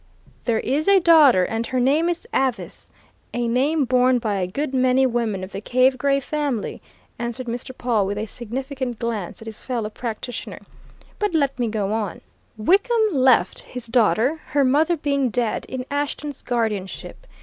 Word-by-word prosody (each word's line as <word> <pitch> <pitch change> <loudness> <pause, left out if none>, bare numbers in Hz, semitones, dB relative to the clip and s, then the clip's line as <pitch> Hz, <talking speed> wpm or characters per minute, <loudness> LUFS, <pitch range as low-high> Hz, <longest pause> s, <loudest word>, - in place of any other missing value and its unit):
"There 230 -2 +1
is 285 +5 -1
a 395 -1 +6
daughter, 310 - +6
and 225 +4 -2
her 255 - -1
name 295 +7 +3
is 345 -1 -3
Avice 265 -3 -2 0.5
a 240 0 0
name 275 +5 +2
borne 255 0 +3
by 215 -4 -1
a 185 -2 -1
good 270 +9 -3
many 255 0 +3
women 230 -6 -1
of 185 - -7
the 195 - -6
Cave 255 +3 +2
Gray 275 +1 +2
family," 280 -5 -3 0.4
answered 235 +1 -4
Mr. 240 +2 -5
Pawle 225 -5 +1
with 205 +1 -3
a 215 - -2
significant 255 +2 -5
glance 225 -4 -4
at - - -15
his 220 -1 -7
fellow 230 -4 -3
practitioner. 235 +1 -6 0.6
"But 415 -5 0
let 280 -4 +1
me 240 - +1
go 210 -2 -1
on: 215 -4 -3 0.4
Wickham 420 - +3
left 260 -3 +3
his 250 -1 -8
daughter, 240 +5 +2
her 285 -1 +2
mother 305 +6 +3
being 280 -3 0
dead, 235 0 -1
in 255 -1 -4
Ashton's 290 0 -3
guardianship. 225 - -3
250 Hz, 170 wpm, -22 LUFS, 225-280 Hz, 0.6 s, a